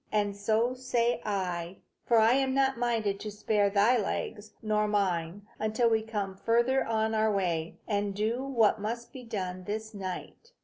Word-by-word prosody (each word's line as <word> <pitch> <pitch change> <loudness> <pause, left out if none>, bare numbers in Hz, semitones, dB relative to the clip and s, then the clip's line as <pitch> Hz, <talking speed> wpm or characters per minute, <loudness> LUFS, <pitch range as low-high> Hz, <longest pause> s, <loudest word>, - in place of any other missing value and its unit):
And 205 -1 +1
so 220 +4 +1
say 245 -2 0
I, 180 -3 -2 0.3
for 235 - +4
I 225 +2 +6
am 265 0 +1
not 270 0 +3
minded 225 -4 0
to 215 - -5
spare 205 0 +1
thy 210 +5 +4
legs 210 0 -4
or 210 0 +2
mine, 195 -2 -1
until 220 +2 +1
we 220 0 +3
come 205 -3 -4
farther 235 +5 +2
on 220 0 0
our 220 0 +2
way, 170 -5 -1
and 205 -2 -1
do 225 +5 -1
what 230 -6 +2
must 235 +3 -4
be 260 - -8
done 185 -5 -4
this 215 +2 -4
night. 195 - -7
215 Hz, 170 wpm, -29 LUFS, 200-235 Hz, 0.3 s, I